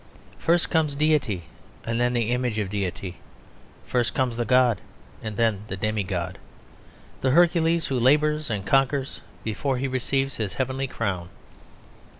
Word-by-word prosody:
First 170 +1 +2
comes 155 -3 +2
Deity 145 - +1 0.4
and 115 +1 -1
then 125 0 +2
the 120 -1 +1
image 125 -3 0
of 100 -3 -2
Deity; 95 -2 -3 0.7
first 120 -2 0
comes 125 -3 +1
the 120 0 -1
god 125 -3 +4 0.4
and 110 -2 -5
then 110 -4 +2
the 95 - -5
demi 110 +1 0
god, 90 -3 -3 0.8
the 130 - +2
Hercules 165 +2 +4
who 130 -2 0
labours 150 +3 +3
and 100 -4 -2
conquers 135 +1 +1 0.2
before 130 +5 -1
he 135 +2 -1
receives 135 +1 -1
his 105 -4 -2
heavenly 130 +1 -1
crown. 95 -8 -3
125 Hz, 150 wpm, -25 LUFS, 110-135 Hz, 0.8 s, god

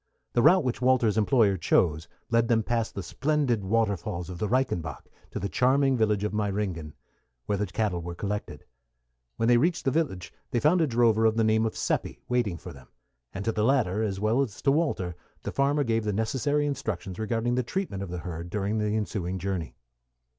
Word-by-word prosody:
The 120 - +3
route 175 +6 +6
which 125 -1 -2
Walter's 125 -4 +3
employer 110 -3 +3
chose 80 -1 +1 0.2
led 115 0 +3
them 115 -1 +2
past 115 -1 -1
the 100 - -4
splendid 135 - 0
waterfalls 100 -4 -1
of 90 - -8
the 105 - -1
Reichenbach 90 - -1 0.2
to - - -6
the 100 - -2
charming 135 +4 +3
village 105 -3 +1
of 105 - -2
Meyringen, 100 -7 -2 0.5
where 100 -1 -1
the 105 - 0
cattle 95 -2 -1
were 85 +1 -6
collected. 105 +3 -4 0.7
When 115 - +1
they 120 0 +6
reached 170 +7 +1
the 135 - +3
village 130 - -2 0.2
they 120 - 0
found 165 +7 +3
a 160 - +3
drover 115 -2 +3
of 110 0 0
the 115 - +3
name 110 +1 +3
of 110 - -6
Seppi - - -1
waiting 120 -8 0
for - - -9
them; 65 -2 -15 0.4
and 100 +1 -6
to 115 - +2
the 105 -1 -1
latter, 110 -6 +2
as 100 -3 -1
well 110 +6 +2
as 120 -8 -3
to 135 - +4
Walter, 135 - 0 0.3
the - - -3
farmer 140 +1 +2
gave 115 -3 0
the 105 -1 -1
necessary 135 +7 0
instructions 110 -10 -4
regarding 115 +2 0
the 125 - +2
treatment 125 - -3
of 100 - -5
the 90 - -4
herd 85 0 -6
during 105 +2 -1
the 105 0 0
ensuing 95 -4 -2
journey. 95 -2 -3
110 Hz, 200 wpm, -27 LUFS, 95-125 Hz, 0.7 s, route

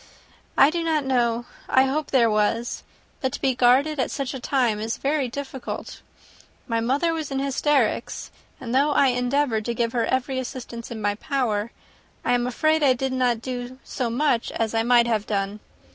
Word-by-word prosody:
"I 275 - +7
do 340 0 -2
not 315 -3 0
know: 240 -2 +1 0.2
I 260 - +5
hope 285 +3 -1
there 245 -4 +4
was. 220 +2 0 0.4
But 260 - 0
to - - -4
be 265 - +1
guarded 260 +5 +3
at 260 - +1
such 275 0 -3
a 265 - -5
time 245 -4 +1
is 220 +2 -3
very 280 -1 0
difficult. 265 0 -6 0.7
My 230 -2 0
mother 275 +9 +1
was 315 -3 -3
in 270 - -3
hysterics; 275 +1 0 0.3
and 235 -1 -5
though 280 +3 +4
I 275 - +4
endeavoured 250 -2 0
to 235 - -2
give 230 0 0
her 235 -1 0
every 260 0 0
assistance 245 -2 -7
in 220 -3 -6
my 205 0 +2
power, 225 -3 -1 0.5
I - - +2
am 245 0 +1
afraid 310 +5 +2
I 275 -3 +5
did 260 +1 -2
not 245 -3 +1
do 250 0 -5
so 250 -4 -3
much 240 -1 +1
as 225 -1 -1
I 225 - +2
might 240 0 +4
have 220 -3 0
done. 200 0 -2
250 Hz, 190 wpm, -24 LUFS, 230-275 Hz, 0.7 s, I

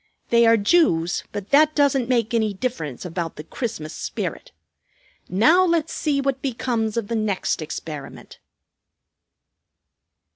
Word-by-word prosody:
They 235 0 +5
are 230 0 +6
Jews; 200 - +2
but 205 -1 -6
that 305 +2 +5
doesn't 275 -4 +2
make 235 -2 +1
any 220 -3 +1
difference 175 - -4
about 170 -2 -4
the 150 - -8
Christmas 185 -6 -5
spirit. - - -5 0.8
Now 240 - +5
let's 335 -3 +1
see 290 -3 0
what 275 -1 -1
becomes 235 -4 -2
of 225 -3 -1
the 230 - -2
next 210 -5 -1
experiment." 155 -2 -8
230 Hz, 125 wpm, -23 LUFS, 185-270 Hz, 0.8 s, are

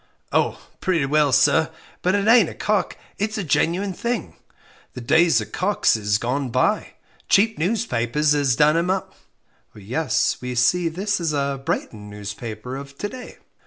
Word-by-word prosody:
"Oh, - - +1 0.2
pretty 170 -6 +1
well, 145 0 +2
sir; 135 +5 +4 0.3
but 185 +2 +2
it 205 +1 0
ain't 225 -6 +6
a - - -10
'cock,' 210 -4 -1 0.2
it's 215 +2 -2
a 200 - -2
genuine 180 +5 0
thing 235 +5 -3 0.6
the - - -7
days 160 +8 +3
of - - -8
cocks 200 - +1
is 105 -1 0
gone 130 +4 -2
bye - - 0 0.3
cheap 220 +2 +3
newspapers 150 - 0
'as 140 -4 +2
done 150 +3 +4
'em 170 +2 0
up." 190 0 -2 0.6
"Yes; 115 +10 -1
we 125 0 -4
see 165 +9 +2
this 195 +5 -2
is 165 -3 -1
a 140 -1 -1
Brighton 110 -9 -4
newspaper 105 +4 -7
of 140 0 -10
to 205 - -3
day." 250 +1 -10
155 Hz, 165 wpm, -22 LUFS, 125-190 Hz, 0.6 s, ain't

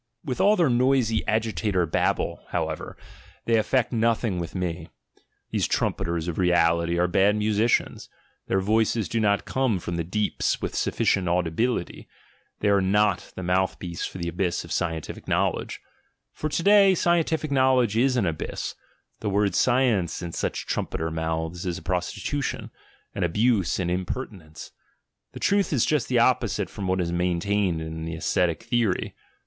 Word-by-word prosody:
With 130 -5 -2
all 210 +1 +5
their 170 -6 +3
noisy 125 -2 +2
agitator 110 -4 0
babble, 80 - -1
however, - - -3 0.5
they 115 -1 +3
effect 125 +3 +1
nothing 115 -4 +1
with 85 +1 -6
me; 85 -3 -3 0.6
these - - 0
trumpeters 85 0 -1
of 85 - -3
reality 85 -1 +2
are 90 +1 +2
bad 95 +3 +3
musicians, 105 +2 0 0.4
their 95 - +1
voices 110 +1 +1
do 115 - -1
not 100 -2 +1
come 130 -6 0
from 85 -1 -4
the 85 - -1
deeps 105 +5 -1
with - - -4
sufficient 95 -2 +1
audibility, 90 +8 -1 0.5
they 105 - +2
are 100 -1 +4
not 100 0 +1
the 95 - -6
mouthpiece 90 -1 -1
for - - -5
the 85 -1 -4
abyss 85 +1 -1
of - - -12
scientific 80 -2 -3
knowledge - - -1 0.3
— - - -49
for 155 - -3
to 165 - -2
day 200 -1 +6
scientific 165 -3 +1
knowledge 130 -5 +3
is 125 +2 +2
an 110 - +2
abyss 80 -3 -3 0.2
— - - -46
the 105 - -2
word 100 0 +1
"science," 120 -10 +2
in 85 - -5
such - - -3
trumpeter 80 0 -2
mouths, 80 +1 -3
is 90 -2 -2
a - - -9
prostitution, 90 - -3 0.4
an - - -2
abuse, 105 +3 +1
an 90 -2 -1
imper 95 +8 -2
tinence. 80 -7 -12 0.6
The - - -8
truth 200 0 +2
is 135 -7 +2
just 150 -5 +1
the 125 - +1
opposite 120 +2 +2
from 100 - -5
what 95 0 +1
is 85 -1 -2
main 90 0 0
tained 100 -3 0
in 80 0 -6
the 80 0 -4
ascetic 85 -1 0
theory. 115 -6 0
100 Hz, 165 wpm, -25 LUFS, 85-120 Hz, 0.6 s, day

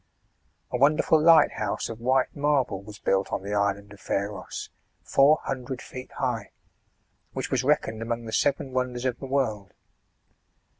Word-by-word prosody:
A - - 0
wonderful 150 +3 +4
lighthouse, 155 -10 +4
of 115 -1 -7
white 130 +2 +1
marble, 140 -9 +1
was 105 +1 -11
built 95 0 0
on - - -2
the 100 +1 -4
island 100 0 -1
of 100 - -15
Pharos, 100 -1 -4 0.3
four 145 +3 +5
hundred 130 -1 -4
feet 130 +2 -9
high, 120 -7 -2 0.8
which - - -4
was - - +1
reckoned 110 0 +1
among 115 0 -3
the 110 - -7
seven 140 -1 +1
wonders 125 -1 -2
of 125 -2 -1
the 135 - -6
world. 110 -8 -1
120 Hz, 150 wpm, -26 LUFS, 105-135 Hz, 0.8 s, four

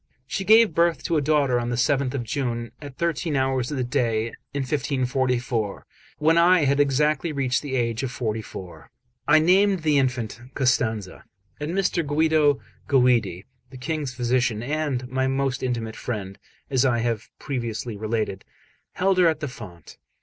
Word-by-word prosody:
She 195 +8 -3
gave 220 -2 +6
birth 170 +1 +2
to 165 - 0
a - - +2
daughter 140 -4 +2
on 120 0 -3
the 120 - -1
7th 135 +1 +1
of 125 - -2
June, 120 -1 -3
at 140 -3 -10
thirteen 170 -2 -1
hours 130 -2 0
of 145 - -3
the 130 - 0
day, 120 -3 0 0.2
in 140 -1 -2
1544, 130 -5 -1 0.3
when 160 +2 +3
I 175 +1 +5
had 140 0 +2
exactly 150 +3 +2
reached 135 -4 0
the 140 -3 -4
age 115 -2 0
of 135 - -2
forty 110 -3 -2
four. 95 -4 -10 0.4
I - - +6
named 185 +3 +3
the 150 -2 +3
infant 125 -4 -2
Costanza; 110 -7 0 0.3
and 150 +3 -3
Mr. 185 -3 +1
Guido 150 -1 +2 0.3
Guidi, 120 -9 +2 0.2
the 130 - -11
King's 140 0 -3
physician, 120 -2 0
and 140 -2 -2
my 130 +1 0
most 135 0 -1
intimate 115 -3 -3
friend, 100 -5 -5 0.3
as 130 -1 +3
I 125 -3 +2
have 115 -2 -2
previously 120 -4 -4
related, 110 -2 -2 0.5
held 190 0 +1
her 180 - +6
at 160 -2 +1
the 150 - -3
font. 105 -9 -11
130 Hz, 165 wpm, -24 LUFS, 120-150 Hz, 0.5 s, gave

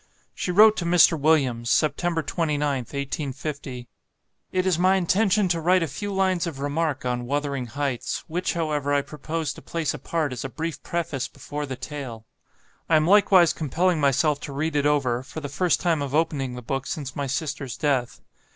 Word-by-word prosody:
She - - -4
wrote 215 +4 +6
to 175 - -2
Mr. 170 -1 +5
Williams, 135 -6 +2
September 165 +3 +1
29th, 145 -7 -1
1850, 140 -2 -5 0.6
"It 185 0 0
is 180 -3 +2
my 185 +2 +4
intention 195 +2 +2
to 170 -1 0
write 180 +2 +3
a - - -1
few 205 +8 -5
lines 190 -3 +1
of 160 -5 -5
remark 145 -1 -1
on 125 -1 -2
'Wuthering 140 -2 -2
Heights,' 135 0 -3
which, 175 +3 -2
however, 150 -3 0
I 140 - +2
propose 155 +1 -4
to - - -12
place 165 -4 -2
apart 150 0 -2
as 125 - -5
a 135 - -4
brief 160 +1 -5
preface 160 -6 -3
before 145 0 -6
the 130 - -4
tale. 130 -4 -7 0.6
I 165 - +5
am 155 0 +4
likewise 190 -2 +5
compelling 165 +3 0
myself 140 +1 +2
to 145 - -7
read 155 +2 -2
it 145 0 +2
over, 130 -5 +1
for 135 +4 -8
the 145 - -5
first 180 +5 +1
time 165 -4 +1
of 140 0 -3
opening 140 -5 0
the 125 - -8
book 135 +3 -3
since 140 -4 -5
my 140 -1 -2
sister's 140 -1 -3
death. 135 -5 0
150 Hz, 185 wpm, -24 LUFS, 135-170 Hz, 0.6 s, wrote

